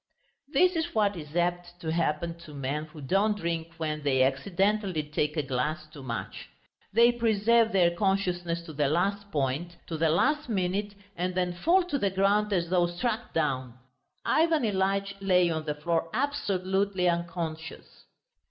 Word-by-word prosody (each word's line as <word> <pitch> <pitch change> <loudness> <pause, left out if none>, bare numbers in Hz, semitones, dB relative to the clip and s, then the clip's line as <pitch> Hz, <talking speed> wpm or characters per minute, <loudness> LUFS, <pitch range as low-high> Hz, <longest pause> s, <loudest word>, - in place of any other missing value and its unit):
This 360 +5 +4
is 325 -2 -2
what 205 -2 +2
is 150 -2 -9
apt 175 0 -1
to 160 - -2
happen 165 0 0
to 155 -3 -12
men 140 +3 -2
who 155 -1 -12
don't 200 +9 +1
drink 165 -2 -3
when 155 -2 -2
they 135 -3 +3
accidentally 185 +6 0
take 150 +1 -2
a 150 - +1
glass 150 +4 -2
too 145 - -10
much. 120 -3 -6 0.4
They 235 +3 +6
preserve 230 0 +3
their 180 -3 +4
consciousness 175 -2 0
to 160 - -9
the 145 -1 +1
last 200 +6 0
point, 145 +4 -1
to 165 - -4
the 165 0 +3
last 295 - +2
minute, 200 0 -1 0.2
and 180 +1 -2
then 180 -1 0
fall 340 - +3
to 310 -6 -2
the 200 - +2
ground 200 +2 +2
as 175 -3 0
though 175 -2 +3
struck 225 +7 -3
down. 130 -6 -1 0.5
Ivan 320 -2 +3
Ilyitch 195 -1 0
lay 180 -3 +3
on 160 -1 -3
the 150 -1 -2
floor 165 +2 -1
absolutely 195 -8 0
unconscious. 170 -2 -4
175 Hz, 160 wpm, -28 LUFS, 160-200 Hz, 0.5 s, They